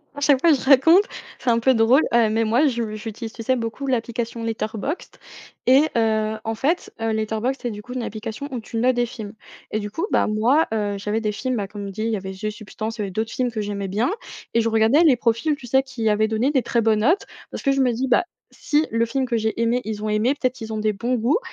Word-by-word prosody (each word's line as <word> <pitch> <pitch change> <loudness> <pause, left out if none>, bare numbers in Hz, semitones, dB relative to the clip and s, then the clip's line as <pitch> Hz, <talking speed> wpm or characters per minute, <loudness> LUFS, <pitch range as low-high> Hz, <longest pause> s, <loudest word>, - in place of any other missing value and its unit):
à 285 - -7
chaque 285 -2 +4
fois 335 - +5
je 270 - 0
raconte, 295 +8 +6 0.4
c'est 260 - -1
un 230 -1 +3
peu 260 +3 +4
drôle, 235 +5 +4
heu, 235 -2 +4
mais 225 +1 +1
moi 235 +7 +3
je 235 -5 -2
j'utilise, 225 +1 -7
tu 230 - -8
sais, 260 +3 +1
beaucoup 235 +3 -4
l'application 235 -2 -2
Letterboxd 225 - -4 0.5
et 265 +4 +6
heu, 220 -1 +1
en 225 0 -2
fait, 300 +10 -1
Letterboxd, 220 +3 -1
c'est, 240 - -2
du 210 -1 -7
coup, 250 +4 -9
une 255 -2 -3
application 220 +5 -5
où 250 - -3
tu 225 +1 -7
notes 250 +2 +3
des 245 0 +2
films 215 -3 -8 0.4
et 215 - 0
du 205 -1 -5
coup, 325 - -2
bah, - - +3
moi, 235 +9 +3
heu, 205 -2 -1
j'avais 210 +3 -2
des 215 -1 0
films, 255 +4 -2
bah, 205 -4 -2
comme 200 0 -7
dit, 215 +3 -4
il 225 - 0
y 220 - 0
avait 190 0 -6
The 210 +3 -4
Substances, 215 +1 -6
il - - -3
y - - 0
avait 195 - -4
d'autres 220 +4 -2
films 250 -1 -1
que 220 -2 -3
j'aimais 200 -1 -3
bien 210 +6 0 0.4
et 230 - +3
je 230 - +1
regardais 225 +8 +4
les 300 -6 +6
profils, 235 +6 +1
tu 270 - -12
sais, 265 +3 +4
qui 255 -4 -4
avaient 215 +1 +2
donné 225 +5 +1
des 270 -3 +2
très 235 - +1
bonnes 220 -1 +2
notes. 320 - +2 0.3
Parce - - -6
que 275 - +3
je 275 0 +2
me 250 - +3
dis: 250 +3 -2
«Bah, 255 - +3 0.3
si 305 +1 0
le 230 0 +2
film 260 +3 -1
que 235 -2 0
j'ai 220 +1 -1
aimé, 235 +2 +2
ils 215 -1 -4
ont 215 - -1
aimé, 215 +5 +2
peut-être 255 -3 -1
qu'ils 225 -2 -7
ont 215 - -2
des 215 0 +1
bons 235 +5 -2
goûts» 240 - +2
230 Hz, 260 wpm, -22 LUFS, 215-255 Hz, 0.5 s, raconte